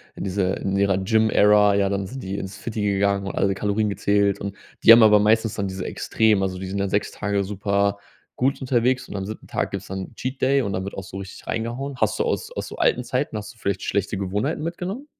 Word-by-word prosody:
in - - -6
dieser 95 -1 0
in 95 0 -2
ihrer 100 -1 +2
Gym 110 +3 +2
Era, 105 -1 +5
ja, 100 -1 +2
dann 100 0 -1
sind 130 +7 -7
die 95 +1 -4
ins 95 0 -6
Fitty 110 -1 -4
gegangen 100 0 +1
und - - -5
alle 100 0 +2
Kalorien 105 +2 0
gezählt. 100 0 +1
Und 100 0 -5 0.3
die - - +9
haben 115 0 +9
aber 105 -1 +7
meistens 110 +1 +2
dann 100 - -2
diese 95 -1 -5
extrem 110 -3 +1
also 95 -1 -2
die 95 - -5
sind 95 +2 -4
ja 100 0 0
6 100 +2 0
Tage 100 -1 -1
super 100 0 0 0.4
gut 135 +3 0
unterwegs. 125 0 +1
Und - - -7
am 95 -1 -3
siebten 110 +2 -8
Tag - - -2
gibt's 100 -1 -5
dann 95 0 -5
'n - - -22
Cheat 130 +3 -5
Day 135 +1 +3
und 100 -6 -2
dann 95 - -2
wird 100 - -6
auch 95 - -5
so 95 +1 -9
richtig 95 -1 -9
reingehauen. 120 +5 -3
Hast - - 0
du - - +3
aus - - -2
aus - - -5
so - - -8
alten 125 - +2
Zeiten 125 +1 -2
hast 105 +3 -7
du - - -27
vielleicht 100 -3 -2
schlechte 100 +1 -1
Gewohnheiten 105 - -2
mitgenommen? 185 - -4
100 Hz, 250 wpm, -23 LUFS, 100-115 Hz, 0.4 s, die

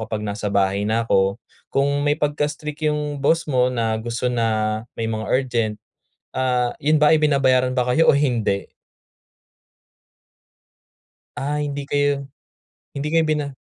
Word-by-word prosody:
kapag 105 -1 -4
nasa 105 0 -3
bahay 100 +1 +1
na 115 +1 +1
ako." 95 -1 +2 0.3
Kung 140 +1 +1
may 145 +1 +2
pagka-strict 150 +1 -2
yung 150 -1 -2
boss 165 +3 +2
mo 125 -3 +2
na 115 -3 0
gusto 120 +2 -3
na 110 -2 0 0.2
may 115 - -1
mga 110 -1 -3
urgent, 120 -5 0 0.6
ah, 125 -2 +1
'yon 155 +2 +3
ba 150 +1 +5
ay 155 - +2
binabayaran 130 -3 +3
ba 125 - +2
kayo 165 +5 +3
o - - +3
hindi? 115 -8 0 2.7
Ah, 150 +2 -2
hindi 145 -1 -4
kayo 145 -1 0 0.7
hindi 140 +1 -3
kayo 165 -1 +4
bina 150 -3 -1
130 Hz, 140 wpm, -21 LUFS, 110-145 Hz, 2.7 s, ba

